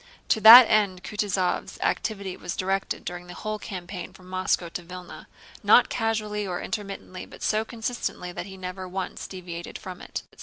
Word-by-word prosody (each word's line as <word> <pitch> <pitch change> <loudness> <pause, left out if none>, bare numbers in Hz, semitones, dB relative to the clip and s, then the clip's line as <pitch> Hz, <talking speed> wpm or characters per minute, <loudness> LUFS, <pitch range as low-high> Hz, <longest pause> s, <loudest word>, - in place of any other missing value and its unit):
To 220 - +3
that 230 +4 +13
end 200 -4 +2
Kutúzov's 195 -4 -1
activity 200 -4 -1
was 175 - -5
directed 195 +1 -2
during 175 0 -6
the 175 - -9
whole 215 0 -4
campaign 185 -3 -7
from 185 0 -16
Moscow 185 -1 0
to 175 - -5
Vílna—not 180 +1 0
casually 215 -2 -1
or 180 -1 -3
intermittently 195 -3 -6
but - - -12
so 215 0 +2
consistently 225 -5 -4
that 175 +1 -6
he 190 -1 -10
never 185 0 -6
once 185 0 -5
deviated 175 -2 -7
from 185 -1 -9
it. - - -6
190 Hz, 160 wpm, -26 LUFS, 180-210 Hz, -, that